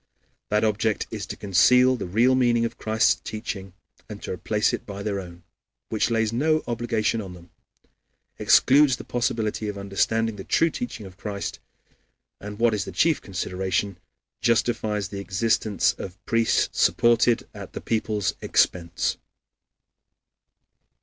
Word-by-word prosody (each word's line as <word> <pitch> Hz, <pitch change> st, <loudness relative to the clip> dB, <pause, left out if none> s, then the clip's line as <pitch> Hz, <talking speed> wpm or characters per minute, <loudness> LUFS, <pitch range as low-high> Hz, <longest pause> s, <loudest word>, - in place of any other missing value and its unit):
That 105 Hz, +1 st, +2 dB
object 110 Hz, 0 st, 0 dB
is 105 Hz, -3 st, -5 dB
to -, -, -6 dB
conceal 125 Hz, +6 st, +4 dB
the 120 Hz, -, -5 dB
real 115 Hz, +8 st, +3 dB
meaning 120 Hz, -2 st, +3 dB
of 115 Hz, -, -6 dB
Christ's 110 Hz, 0 st, +2 dB
teaching 95 Hz, -3 st, -6 dB, 0.4 s
and 105 Hz, -1 st, -7 dB
to -, -, -5 dB
replace 105 Hz, +4 st, 0 dB
it -, -, -3 dB
by 100 Hz, -1 st, -7 dB
their 100 Hz, -2 st, -2 dB
own, 85 Hz, -2 st, -10 dB, 0.5 s
which 110 Hz, +1 st, 0 dB
lays 115 Hz, -1 st, 0 dB
no 155 Hz, +5 st, +1 dB
obligation 115 Hz, -2 st, -1 dB
on 95 Hz, -3 st, -8 dB
them, 85 Hz, 0 st, -16 dB, 0.9 s
excludes 135 Hz, -1 st, +5 dB
the -, -, -9 dB
possibility 110 Hz, -3 st, -2 dB
of 105 Hz, -1 st, -4 dB
understanding 105 Hz, +3 st, 0 dB
the 95 Hz, -, -7 dB
true 165 Hz, -, +2 dB
teaching 145 Hz, -, -6 dB
of 95 Hz, -1 st, -12 dB
Christ, 100 Hz, 0 st, -5 dB, 0.8 s
and 105 Hz, +1 st, -8 dB
what 115 Hz, 0 st, +3 dB
is 105 Hz, -, -1 dB
the -, -, -7 dB
chief 165 Hz, -2 st, +2 dB
consideration, 95 Hz, 0 st, -2 dB, 0.4 s
justifies 110 Hz, -4 st, 0 dB
the 100 Hz, -, -6 dB
existence 100 Hz, 0 st, +1 dB
of 95 Hz, -1 st, -7 dB
priests 115 Hz, -1 st, +1 dB
supported 120 Hz, 0 st, +3 dB
at -, -, -10 dB
the -, -, -6 dB
people's 110 Hz, -4 st, -1 dB
expense. 85 Hz, -2 st, +1 dB
110 Hz, 145 wpm, -24 LUFS, 100-115 Hz, 0.9 s, excludes